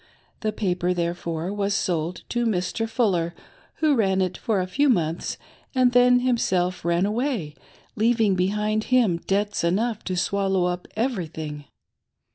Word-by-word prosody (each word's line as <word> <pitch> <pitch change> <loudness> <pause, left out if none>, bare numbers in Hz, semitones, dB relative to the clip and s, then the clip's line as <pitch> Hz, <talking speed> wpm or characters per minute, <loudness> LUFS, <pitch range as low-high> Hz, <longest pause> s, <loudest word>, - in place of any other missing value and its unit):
The 215 - -1
paper, 180 -3 -1
therefore, 170 +1 -2
was 200 -1 0
sold 170 -1 -1
to 240 -1 0
Mr. 220 +3 -1
Fuller, 180 -8 0 0.4
who 310 -2 +2
ran 195 -6 +2
it 185 -1 0
for 215 -4 -1
a 180 - 0
few 280 +10 +1
months 170 -7 0 0.4
and 255 -1 +4
then 245 0 +5
himself 185 -8 0
ran 170 +2 +2
away, 215 - -1 0.4
leaving 225 -2 +3
behind 210 +4 0
him 235 -9 +3
debts 205 0 0
enough 215 +6 0
to 185 -1 -2
swallow 195 -1 +1
up 180 0 -3
every 225 -7 -1
thing. 150 -2 -7
195 Hz, 145 wpm, -24 LUFS, 175-225 Hz, 0.4 s, then